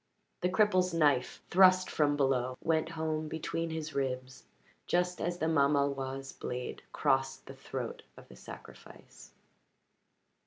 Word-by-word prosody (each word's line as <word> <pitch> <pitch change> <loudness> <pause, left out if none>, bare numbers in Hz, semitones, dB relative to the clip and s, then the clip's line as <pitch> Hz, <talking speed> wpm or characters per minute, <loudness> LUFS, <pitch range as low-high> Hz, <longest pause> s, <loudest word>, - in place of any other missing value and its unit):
The 180 - +2
cripple's 185 -3 +2
knife, 145 -6 +2
thrust 185 0 +6
from 145 -1 +1
below, 130 -2 +1
went 160 -1 +1
home 155 0 -1
between 165 +1 -3
his 160 -1 -5
ribs 130 -1 -3 0.4
just 180 0 0
as 175 +1 -1
the 160 - -1
mamaloi's 140 -3 +1
blade 125 0 -5
crossed 135 0 0
the 135 - -9
throat 130 -2 -6 0.2
of - - -14
the 65 - -14
sacrifice. 65 - -13
145 Hz, 125 wpm, -31 LUFS, 135-165 Hz, 0.4 s, thrust